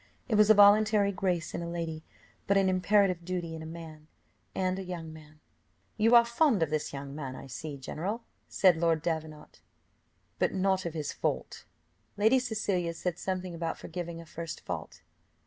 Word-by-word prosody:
It 235 - -2
was 210 0 +5
a 220 - +8
voluntary 205 0 +6
grace 180 -4 -1
in - - -3
a 170 - -4
lady, 165 -2 -4 0.4
but 200 - +4
an 195 -1 +3
imperative 185 -1 +2
duty 175 -2 -3
in 160 - -6
a 160 - -7
man 160 -2 -10 0.5
and 185 0 0
a - - -4
young 170 -3 -6
man. 155 -1 -15 0.6
"You 225 +2 +4
are 235 0 +8
fond 235 - +3
of 155 - -2
this 155 -1 -1
young 140 0 -7
man, 135 -3 -6
I - - -9
see 140 +2 -6
general," 185 - -4 0.3
said 185 -4 +4
Lord 165 -1 +1
Davenant. 160 -2 -5 0.8
"But - - +1
not 190 -1 +1
of 165 - -6
his 150 -2 -3
fault." - - -3 0.5
Lady 220 +6 +4
Cecilia 200 -8 -1
said 180 0 -3
something 185 -1 -3
about 165 -1 -3
forgiving 170 -2 -6
a 165 - -10
first 165 0 -7
fault. 85 -3 -6
175 Hz, 180 wpm, -30 LUFS, 160-200 Hz, 0.8 s, a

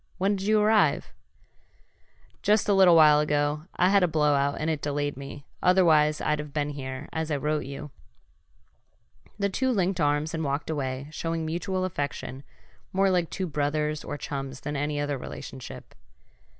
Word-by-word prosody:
When'd 195 +1 +1
you 215 +2 +3
arrive?" 215 0 +2 1.3
"Just 210 +1 +2
a 205 - +4
little 190 -3 +7
while 150 -2 +7
ago. 150 +1 0
I 180 - +3
had 200 0 +4
a 180 - +4
blowout 145 -3 +2
and 155 - -2
it 155 -3 -1
delayed 145 0 -2
me, 140 +1 -9 0.2
otherwise 160 -5 +4
I'd 150 0 0
have 150 -1 -6
been 150 -1 -1
here, 130 -2 -6
as 160 0 -2
I 150 - 0
wrote 150 +2 -1
you." 140 +2 -7 1.5
The 200 -1 +1
two 260 +7 0
linked 190 -6 0
arms 145 +1 +1
and 160 -1 -2
walked 140 +2 -2
away, 135 -3 -3
showing 165 0 -3
mutual 185 +3 -2
affection 145 -5 -4 0.5
more 195 0 +2
like 175 -3 +1
two 190 - -3
brothers 150 -1 -1
or 145 - -5
chums 135 -2 -5
than 150 - -4
any 145 +1 -1
other 145 -2 -2
relationship. 130 0 -9
150 Hz, 165 wpm, -27 LUFS, 145-180 Hz, 1.5 s, little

